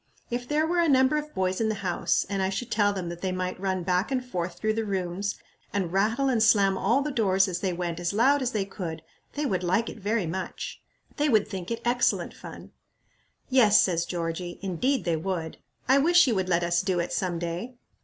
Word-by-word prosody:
If 245 +1 -3
there 300 +3 +1
were 345 +2 0
a 335 -2 +3
number 265 +1 +4
of 300 0 -5
boys 185 +2 0
in 220 - +1
the 215 - -1
house, 175 - +1
and 200 -1 -2
I 190 - +1
should 210 +5 -4
tell 205 -2 +3
them 185 -4 -4
that 175 0 -7
they 190 - -1
might 185 0 -3
run 190 -2 -1
back 180 +6 0
and 255 -1 -1
forth 175 -6 -4
through 215 +2 0
the 225 +1 -1
rooms, 195 0 -2 0.4
and 185 -4 -2
rattle 225 +8 +2
and 245 -4 +2
slam 200 -3 +4
all 235 +9 +2
the 300 - -2
doors 195 -6 +2
as 180 -2 -3
they 190 -1 -1
went 175 -1 -3
as 175 0 -1
loud 270 +7 +3
as 255 - 0
they 210 -4 -1
could, 170 -5 -6 0.3
they 295 +1 -2
would 185 -8 -1
like 185 +6 +1
it - - -9
very 210 0 0
much. 185 +4 -5 0.4
They 295 0 +2
would 215 -5 +3
think 190 -3 -6
it 230 - -4
excellent 245 +1 +1
fun." - - -11 0.8
"Yes," 235 -6 +5
says 170 -2 +1
Georgie, 175 0 -4
"indeed, 230 - 0
they 170 -2 +1
would. 165 -1 -3 0.3
I 265 +2 +5
wish 345 +4 +5
you 250 - +1
would 190 -2 -1
let 175 -1 +2
us 170 0 +2
do 190 -2 0
it 170 - -2
some 180 -3 -1
day." 170 +9 -4
195 Hz, 225 wpm, -27 LUFS, 180-240 Hz, 0.8 s, Yes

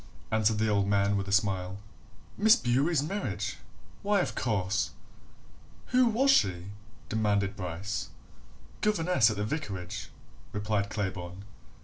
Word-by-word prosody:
answered 110 0 +2
the 110 +1 +1
old 100 -2 +2
man 100 0 +2
with 100 0 -2
a - - -4
smile. 95 -3 +1 0.6
"Miss 220 +2 +6
Bewery's 140 - +1
marriage? 195 +7 -3 0.4
why, 205 0 +2
of - - -1
course!" 100 -4 0 1.0
"Who 255 -1 +4
was 255 +5 +4
she?" 95 - +2 0.4
demanded 100 -2 0
Bryce. 95 +2 -4 0.7
"Governess 180 - +3
at 105 - -3
the 105 - -1
vicarage," 105 - -4 0.4
replied 105 -1 -1
Claybourne. 95 -3 -4
105 Hz, 120 wpm, -29 LUFS, 100-150 Hz, 1.0 s, Miss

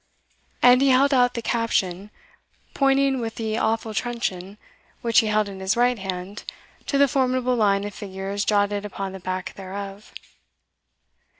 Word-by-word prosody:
And 250 +1 +7
he 275 - +4
held 275 +2 +4
out 245 -1 +3
the 235 - -4
caption, 205 -5 -1 0.6
pointing 275 -1 +2
with 225 -2 -4
the 220 0 -2
awful 220 0 -1
truncheon, 205 -4 -3 0.5
which 230 -1 +4
he 225 - +1
held 215 0 +1
in 195 -1 -8
his 190 +4 0
right 245 -1 +2
hand, 190 +1 -6 0.4
to 280 - +1
the 280 0 +5
formidable 255 -1 +1
line 200 -3 +2
of 205 0 -5
figures 195 0 -4
jotted 205 -1 +1
upon 195 -1 -5
the 190 - -8
back 185 +1 -4
thereof. 195 +1 -8
215 Hz, 155 wpm, -23 LUFS, 195-245 Hz, 0.6 s, And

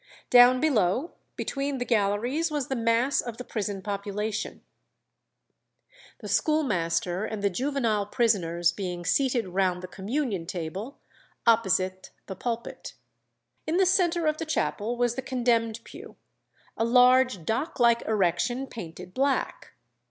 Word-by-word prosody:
Down 250 +1 +7
below 255 - +1 0.2
between 275 0 -3
the 245 - -3
galleries 235 +9 +1
was 295 -4 -3
the 265 - -1
mass 230 +3 +2
of 235 -2 -7
the 250 - -6
prison 205 -5 -4
population; 205 +2 -4 1.6
the - - -7
schoolmaster 185 - 0
and 215 -2 -4
the 200 - +2
juvenile 235 -3 0
prisoners 175 -8 +1
being 175 -2 -5
seated 245 -2 +1
round 180 -1 0
the - - -5
communion 200 - -3
table, 185 - -5 0.5
opposite 190 -5 +2 0.2
the 190 - -7
pulpit. 235 +4 -5 0.7
In 320 +3 +1
the 380 - +4
centre 350 -3 +2
of 305 0 +1
the 325 - -4
chapel 240 -6 -1
was 240 -1 +1
the 265 - -4
condemned 235 -3 0
pew, - - -12 0.6
a - - 0
large 250 -5 +4
dock 230 - -2
like 235 -1 +4
erection 215 +5 0
painted 180 -6 -9
black. 275 0 -1
230 Hz, 130 wpm, -27 LUFS, 195-260 Hz, 1.6 s, Down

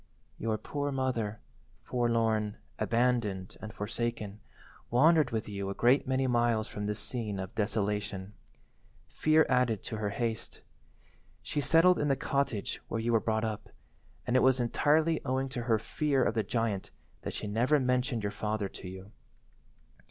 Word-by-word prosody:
"Your 110 -1 0
poor 145 +5 -3
mother, 120 -6 -1 0.4
forlorn, 115 -3 +1 0.2
abandoned, 115 -6 0
and 110 - -6
forsaken, 110 -1 -3 0.5
wandered 155 +3 +5
with 110 -2 -2
you 100 -2 -4
a 100 - -4
great 130 +4 +3
many 130 0 +1
miles 120 -3 +2
from 105 0 -4
this 105 0 -2
scene 110 -5 -3
of 95 0 -5
desolation. 105 -2 -2 0.8
Fear 155 +1 +4
added 125 -5 +2
to 110 - -4
her 105 -1 -1
haste. 115 +1 -3 0.8
She 145 - -2
settled 165 +5 +5
in 145 - +1
the 135 - +3
cottage 140 -7 -1
where 115 - -2
you 115 +1 0
were 115 - +5
brought 110 0 0
up, 105 -1 -4 0.6
and 125 - 0
it 130 - +6
was 130 -1 +4
entirely 155 +6 +2
owing 130 0 -1
to 130 -2 -4
her 115 -2 +3
fear 135 +4 0
of - - +1
the 110 - +1
giant 110 -2 -1 0.3
that - - -5
she - - -4
never 120 +8 +2
mentioned 125 -2 0
your 100 - -1
father 105 -1 -2
to 95 - -10
you. 95 +2 -9
115 Hz, 160 wpm, -30 LUFS, 105-130 Hz, 0.8 s, it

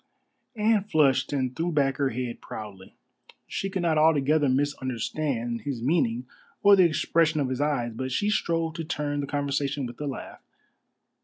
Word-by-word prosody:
Anne 215 -1 +2
flushed 155 -9 +2
and 130 -3 -1
threw 170 +2 -1
back 140 -3 +1
her 140 -2 +1
head 125 0 -4
proudly. 100 -3 -9 0.5
She 195 - -3
could 190 -2 -2
not 160 -2 +2
altogether 150 -2 +3
misunderstand 130 -2 -1
his 130 +1 -4
meaning 125 -5 +1 0.4
or 200 0 +8
the 185 -2 +6
expression 160 -1 +2
of 135 -3 0
his 130 +1 -2
eyes, 140 -5 0
but 130 +3 -4
she 205 +11 +1
strove 165 -5 0
to 165 0 -5
turn 150 -2 -2
the 140 - -3
conversation 140 -1 -1
with 120 +3 -8
a 145 - -2
laugh. 135 - -7
145 Hz, 165 wpm, -26 LUFS, 130-160 Hz, 0.5 s, or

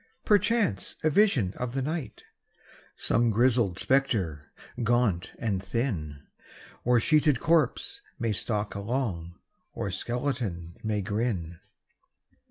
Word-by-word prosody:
Perchance 205 - +2
a 155 - +3
vision 140 - +3
of 125 0 -4
the 135 - 0
night, 155 0 -4 0.7
Some 120 0 +2
grizzled 115 -4 +3
spectre, 100 - 0 0.3
gaunt 115 -6 +1
and 100 -5 -1
thin, 85 - -3 0.6
Or 125 0 +4
sheeted 150 0 +3
corpse, 160 -4 +1 0.2
may 115 -2 0
stalk 105 0 -1
along, 100 -6 -3 0.4
Or 100 - -3
skeleton 110 -6 -3
may 105 -2 -1
grin. 95 -6 -2
115 Hz, 105 wpm, -28 LUFS, 95-130 Hz, 0.7 s, Or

